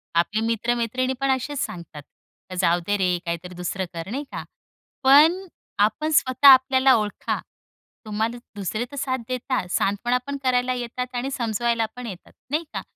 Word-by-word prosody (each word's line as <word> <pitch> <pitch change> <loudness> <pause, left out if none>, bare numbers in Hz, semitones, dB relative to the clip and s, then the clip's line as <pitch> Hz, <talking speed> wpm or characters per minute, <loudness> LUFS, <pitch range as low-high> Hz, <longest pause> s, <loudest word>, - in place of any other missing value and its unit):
आपले 190 +6 +1
मित्र-मैत्रिणी 240 +3 0
पण 275 - 0
असेच 280 +2 -5
सांगतात, 170 -4 -9 0.6
"जाऊ 175 -1 +3
दे 205 0 +1
रे 180 -2 +1
काहीतरी 170 +1 -5
दुसरं 180 +1 -3
कर," 165 +3 -6
नाही 280 +4 -3
का? - - -5 0.6
पण 310 +8 +6 0.4
आपण 305 +8 -4
स्वतः 270 -1 +4
आपल्याला 260 0 +7
ओळखा. 210 -2 -2 0.7
तुम्हाला 220 +3 -2 0.2
दुसरे 210 +4 -2
तर 285 - -8
साथ 260 -1 -1
देतात, 255 -5 -2
सांत्वनापण 245 +7 0
करायला 255 0 +2
येतात 250 +1 -5
आणि 245 +2 -2
समजवायलापण 235 0 -1
येतात. 190 -4 -9 0.2
नाही 310 +3 +1
का? - - -3
240 Hz, 145 wpm, -24 LUFS, 205-260 Hz, 0.7 s, आपल्याला